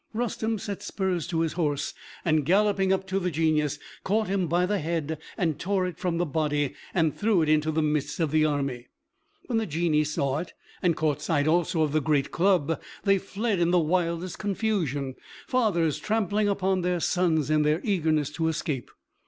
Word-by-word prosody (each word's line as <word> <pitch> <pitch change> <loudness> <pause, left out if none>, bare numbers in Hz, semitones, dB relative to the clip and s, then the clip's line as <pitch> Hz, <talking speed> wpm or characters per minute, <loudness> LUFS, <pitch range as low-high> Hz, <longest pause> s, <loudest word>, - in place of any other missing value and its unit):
Rustem 225 -1 -1
set 200 0 -5
spurs 185 -5 -2
to 165 -2 0
his 165 -1 0
horse, 150 -4 -1 0.3
and 155 -3 +3
galloping 195 +3 +3
up 190 0 +1
to 190 0 -1
the 180 -1 -1
Genius, 155 -2 +1 0.3
caught 215 +2 +1
him 190 -2 0
by 175 +3 +2
the 205 +2 0
head, 160 -1 -2 0.4
tore 190 0 0
it 180 -2 -5
from 175 -2 -1
the 175 - +1
body, 150 -2 0 0.2
and 160 -4 +1
threw 205 -6 +2
it 155 - 0
into 155 0 +3
the 155 0 +1
midst 150 0 -1
of 160 -4 +1
the 155 0 +3
army. 140 -5 -1 0.6
When 230 -3 0
the 225 - -2
Genii 155 -1 +1
saw 140 -2 -1
it, 170 - -7 0.3
and 175 -3 +2
caught 150 -2 0
sight 150 -1 +1
also 165 0 +2
of 150 - 0
the 155 +1 +2
great 145 -1 +1
club, 170 -3 +2 0.2
they 195 -1 +4
fled 200 +1 -2
in 170 0 +3
the 180 - +4
wildest 170 +1 0
confusion, 175 - -1 0.3
fathers 185 - +1
trampling 210 -1 0
upon 190 -1 +1
their 180 0 0
sons 160 -4 +1
in 155 0 +4
their 150 +2 +2
eagerness 160 - +1
to 160 -1 -1
escape. 155 -5 -2
165 Hz, 185 wpm, -27 LUFS, 155-190 Hz, 0.6 s, they